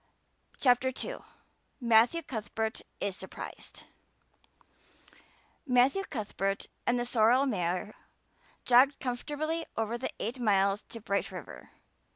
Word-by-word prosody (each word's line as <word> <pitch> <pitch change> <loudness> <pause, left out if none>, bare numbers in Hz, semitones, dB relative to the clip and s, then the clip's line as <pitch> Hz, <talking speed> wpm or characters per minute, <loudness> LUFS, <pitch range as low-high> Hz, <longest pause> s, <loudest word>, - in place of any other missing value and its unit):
CHAPTER 250 -1 +4 0.2
II. - - -4 0.6
Matthew 235 +7 +4
Cuthbert 220 -3 -3 0.2
is 195 - -1
surprised 190 - -9 1.8
MATTHEW 260 +10 +3
Cuthbert 200 - -2 0.2
and 245 - +3
the 240 - -1
sorrel 240 +3 +4
mare 185 -3 -1 0.7
jogged 260 +3 +5
comfortably 300 +6 -2
over 225 +2 -1
the 260 - -2
eight 240 +5 -3
miles 200 -3 +3
to 230 - -7
Bright 200 -1 -1
River. - - -9
240 Hz, 105 wpm, -30 LUFS, 210-260 Hz, 1.8 s, jogged